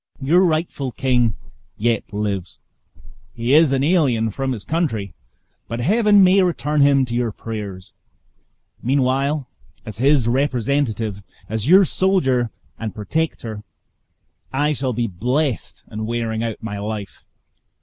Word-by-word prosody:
Your 160 Hz, +7 st, +3 dB
rightful 155 Hz, -6 st, -1 dB
king 125 Hz, -6 st, +1 dB, 0.4 s
yet 115 Hz, 0 st, -1 dB
lives; 100 Hz, -3 st, -3 dB, 0.8 s
he 120 Hz, +3 st, 0 dB
is 155 Hz, -1 st, +6 dB
an 135 Hz, 0 st, +1 dB
alien 135 Hz, -10 st, +2 dB
from 135 Hz, +4 st, -2 dB
his 110 Hz, -6 st, -4 dB
country, 115 Hz, -, -2 dB, 0.5 s
but 115 Hz, -, -4 dB
Heaven 205 Hz, -, +4 dB
may 190 Hz, +1 st, +5 dB
return 150 Hz, -5 st, +1 dB
him 140 Hz, -1 st, +4 dB
to 120 Hz, -, -6 dB
your 120 Hz, -1 st, 0 dB
prayers. 100 Hz, -4 st, -7 dB, 0.9 s
Meanwhile, 135 Hz, +2 st, +1 dB, 0.4 s
as 110 Hz, -1 st, -8 dB
his 135 Hz, -2 st, +3 dB
representative, 120 Hz, -5 st, 0 dB, 0.3 s
as 110 Hz, +2 st, -3 dB
your 190 Hz, +4 st, +7 dB
soldier 135 Hz, -12 st, +1 dB, 0.3 s
and 110 Hz, -2 st, -5 dB
protector, 110 Hz, -2 st, -3 dB, 0.9 s
I 145 Hz, +3 st, +1 dB
shall 130 Hz, -2 st, -2 dB
be 120 Hz, +1 st, -1 dB
blessed 125 Hz, -, -2 dB
in 110 Hz, 0 st, -4 dB
wearing 115 Hz, -1 st, -2 dB
out 115 Hz, -1 st, -4 dB
my 105 Hz, -2 st, -4 dB
life. 105 Hz, -2 st, -6 dB
125 Hz, 130 wpm, -21 LUFS, 110-145 Hz, 0.9 s, your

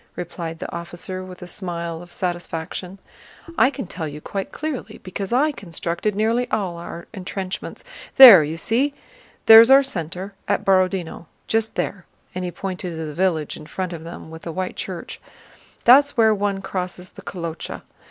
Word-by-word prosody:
replied 170 Hz, -1 st, -6 dB
the 175 Hz, -, -6 dB
officer 175 Hz, +2 st, -6 dB
with 185 Hz, -1 st, -10 dB
a -, -, -8 dB
smile 170 Hz, -3 st, -5 dB
of 175 Hz, 0 st, -13 dB
satisfaction. 175 Hz, +1 st, -4 dB, 0.6 s
"I 265 Hz, -, +5 dB
can 275 Hz, -4 st, -6 dB
tell 165 Hz, -2 st, -5 dB
you 150 Hz, 0 st, -7 dB
quite 195 Hz, +5 st, -5 dB
clearly, 305 Hz, -4 st, -5 dB
because 190 Hz, +1 st, -5 dB
I 285 Hz, +6 st, +3 dB
constructed 180 Hz, -, -3 dB
nearly 230 Hz, +4 st, +1 dB
all 185 Hz, -5 st, -2 dB
our 170 Hz, 0 st, -8 dB
entrenchments. 190 Hz, -1 st, -6 dB, 0.3 s
There, 230 Hz, -11 st, +12 dB
you 155 Hz, +2 st, -4 dB
see? 265 Hz, -, 0 dB, 0.5 s
There's 225 Hz, +1 st, +10 dB
our 270 Hz, +1 st, +8 dB
center, 185 Hz, -, -4 dB
at -, -, 0 dB
Borodinó, 185 Hz, -3 st, +1 dB, 0.2 s
just 225 Hz, 0 st, -1 dB
there," 190 Hz, -3 st, -3 dB, 0.3 s
and 185 Hz, -, -4 dB
he 180 Hz, -, -2 dB
pointed 180 Hz, -1 st, -5 dB
to 160 Hz, 0 st, -4 dB
the 150 Hz, -, -6 dB
village 165 Hz, -3 st, 0 dB
in 155 Hz, -, -11 dB
front 185 Hz, +1 st, -4 dB
of 160 Hz, -1 st, -7 dB
them 165 Hz, -1 st, -9 dB
with 160 Hz, 0 st, -9 dB
the 165 Hz, -, -6 dB
white 185 Hz, +2 st, -4 dB
church. 180 Hz, -3 st, -6 dB, 0.6 s
"That's 280 Hz, +4 st, +6 dB
where 220 Hz, -1 st, +5 dB
one 200 Hz, -1 st, -1 dB
crosses 185 Hz, -1 st, -5 dB
the -, -, -12 dB
Kolochá. 170 Hz, -3 st, -6 dB
185 Hz, 170 wpm, -22 LUFS, 170-205 Hz, 0.6 s, There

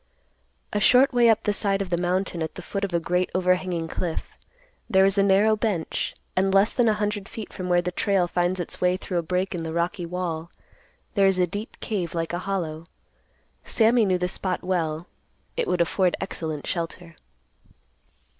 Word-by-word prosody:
A 210 Hz, -, +1 dB
short 255 Hz, +6 st, +5 dB
way 240 Hz, -1 st, +5 dB
up 220 Hz, -, +3 dB
the 210 Hz, -, +1 dB
side 200 Hz, -1 st, 0 dB
of 195 Hz, -2 st, -4 dB
the -, -, +3 dB
mountain 180 Hz, 0 st, -1 dB
at 160 Hz, -, -3 dB
the 185 Hz, -, -8 dB
foot 200 Hz, +2 st, -4 dB
of 200 Hz, -, -1 dB
a 170 Hz, -, +1 dB
great 180 Hz, +2 st, 0 dB
overhanging 180 Hz, -2 st, +1 dB
cliff, 165 Hz, 0 st, -4 dB, 0.6 s
there 190 Hz, 0 st, +5 dB
is 195 Hz, 0 st, +4 dB
a -, -, +6 dB
narrow 200 Hz, +2 st, +4 dB
bench, 205 Hz, -7 st, -2 dB, 0.2 s
and 190 Hz, +1 st, +2 dB
less 195 Hz, +3 st, +4 dB
than 245 Hz, -2 st, +3 dB
a 215 Hz, -, +2 dB
hundred 210 Hz, -1 st, -2 dB
feet 220 Hz, -3 st, -8 dB
from 180 Hz, -1 st, -5 dB
where 175 Hz, 0 st, +3 dB
the 180 Hz, -, -2 dB
trail 190 Hz, 0 st, +1 dB
finds 175 Hz, +1 st, 0 dB
its 175 Hz, -, -5 dB
way 180 Hz, 0 st, +3 dB
through 180 Hz, -1 st, -2 dB
a -, -, 0 dB
break 180 Hz, +4 st, -1 dB
in 175 Hz, -, -3 dB
the 160 Hz, 0 st, -4 dB
rocky 170 Hz, +1 st, -1 dB
wall, 170 Hz, -2 st, -3 dB, 0.6 s
there 195 Hz, -2 st, +4 dB
is 190 Hz, -1 st, +2 dB
a 180 Hz, -, +4 dB
deep 205 Hz, +6 st, -7 dB
cave 180 Hz, -6 st, -3 dB
like 165 Hz, -1 st, -1 dB
hollow. 175 Hz, -3 st, -3 dB, 0.8 s
Sammy 230 Hz, +1 st, +3 dB
knew 185 Hz, -2 st, +2 dB
the 180 Hz, 0 st, -1 dB
spot 185 Hz, 0 st, -3 dB
well. 165 Hz, -3 st, -1 dB, 0.5 s
It -, -, -1 dB
would 180 Hz, -, +1 dB
afford 180 Hz, +1 st, +2 dB
excellent 160 Hz, -6 st, -4 dB
shelter. 170 Hz, 0 st, -4 dB
185 Hz, 190 wpm, -25 LUFS, 175-200 Hz, 0.8 s, a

